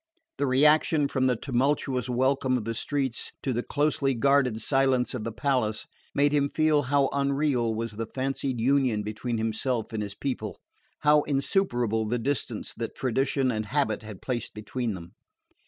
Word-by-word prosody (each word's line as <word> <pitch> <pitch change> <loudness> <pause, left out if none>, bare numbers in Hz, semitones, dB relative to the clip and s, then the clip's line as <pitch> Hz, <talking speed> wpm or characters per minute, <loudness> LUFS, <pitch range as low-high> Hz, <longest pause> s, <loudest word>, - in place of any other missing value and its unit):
The 140 - +1
reaction 150 +2 +4
from 130 -1 +1
the 125 - +2
tumultuous 130 0 0
welcome 130 +1 +2
of 110 - -5
the 115 - -2
streets 135 0 -2
to 135 - 0
the 120 - 0
closely 145 -1 0
guarded 130 -2 +3
silence 135 0 +2
of 125 -4 -4
the 115 - -3
palace 115 -4 0 0.3
made 145 0 +3
him 140 -1 +2
feel 155 -1 +3
how 140 0 +2
unreal 140 -4 +1
was 115 0 -3
the 110 +1 -5
fancied 135 0 -2
union 125 -3 +2
between 110 +3 -3
himself 115 +1 -2
and 110 - -2
his 100 -1 -4
people, 110 -6 -4 0.4
how 150 0 +5
insuperable 125 - +1
the 120 +3 0
distance 135 +2 -2
that - - -4
tradition 135 +1 +1
and 110 -2 -3
habit 135 -6 0
had 105 -3 -10
placed 120 -3 -3
between 110 +1 -3
them. 85 -1 -10
130 Hz, 165 wpm, -27 LUFS, 115-140 Hz, 0.4 s, how